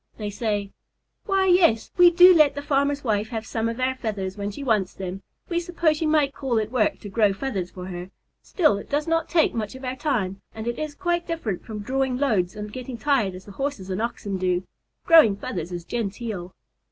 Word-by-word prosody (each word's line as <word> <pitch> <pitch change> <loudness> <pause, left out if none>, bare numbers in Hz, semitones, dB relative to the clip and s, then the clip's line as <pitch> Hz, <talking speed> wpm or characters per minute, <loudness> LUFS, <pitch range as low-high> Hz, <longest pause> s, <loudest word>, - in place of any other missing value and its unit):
they 210 -2 -4
say, 205 -2 -2 0.6
"Why, 390 -1 +2
yes, 350 -12 +4
we 355 -1 +8
do 360 +1 +8
let 305 -4 +5
the 285 - -5
farmer's 285 0 +1
wife 215 -2 0
have 225 -2 -4
some 230 -1 -1
of 230 +2 -5
our 260 +1 +1
feathers 200 -6 -4
when 205 -1 -3
she 210 +7 -7
wants 215 -7 +1
them. 190 0 -5 0.3
We 340 -1 0
suppose 335 -3 0
you 320 - +1
might 300 -3 +2
call 260 -4 -1
it 220 0 -1
work 240 -5 +1
to - - -8
grow 210 -1 +3
feathers 195 -4 -3
for 180 -1 -9
her, 180 0 -7 0.3
still 305 - +2
it - - -11
does 295 +2 0
not 330 0 0
take 325 -2 +3
much 220 +1 -4
of 260 0 -8
our 255 0 -2
time, 210 -10 -1
and 220 0 -6
it 240 - -2
is 305 -1 -4
quite 345 -1 -1
different 245 - -3
from 215 -2 -6
drawing 265 +3 -1
loads 215 -10 +1
and 210 0 -7
getting 255 -1 -6
tired 230 -7 +1
as 185 - -11
the 205 - -11
Horses 200 -4 -4
and 185 +3 -2
Oxen 205 -4 -3
do. 180 0 0 0.4
Growing 320 - +7
feathers 180 -3 -5
is 175 -1 -5
genteel." 210 -4 -4
230 Hz, 215 wpm, -24 LUFS, 200-285 Hz, 0.6 s, we